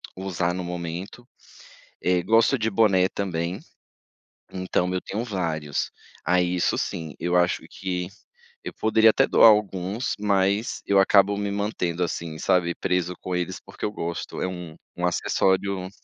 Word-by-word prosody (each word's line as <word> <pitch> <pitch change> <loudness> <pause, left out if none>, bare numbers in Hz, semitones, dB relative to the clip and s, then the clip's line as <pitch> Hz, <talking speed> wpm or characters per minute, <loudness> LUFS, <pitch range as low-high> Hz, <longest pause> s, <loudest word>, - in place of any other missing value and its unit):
usar 90 -2 -2
no 90 0 -4
momento. 90 +7 -6 0.8
Eh, 90 -1 +2
gosto 115 +7 +3
de 110 0 0
boné 95 -3 +3
também, 90 -2 -3 1.0
então 90 -1 -1
eu 90 - -1
tenho 110 +4 -4
vários. 80 - -2 0.3
Aí, 90 +1 +2
isso 90 - +1
sim, 80 -2 -4
eu 90 +1 0
acho 90 0 +2
que 90 -2 -4 0.6
eu - - -4
poderia 110 0 +5
até - - +3
doar - - +7
alguns, 105 +2 0
mas 100 +1 +1
eu 100 -1 +3
acabo 100 +1 +5
me 100 0 -2
mantendo 100 -4 -2
assim, 85 -2 -3
sabe, 90 -2 +1
preso 90 -1 -1
com 90 -1 -3
eles, 90 +1 -3
porque 95 - -9
eu 105 - -1
gosto. 85 -4 -5
É - - 0
um 90 -3 -7 0.2
um 90 - -4
acessório 95 +1 0
95 Hz, 150 wpm, -25 LUFS, 90-100 Hz, 1.0 s, doar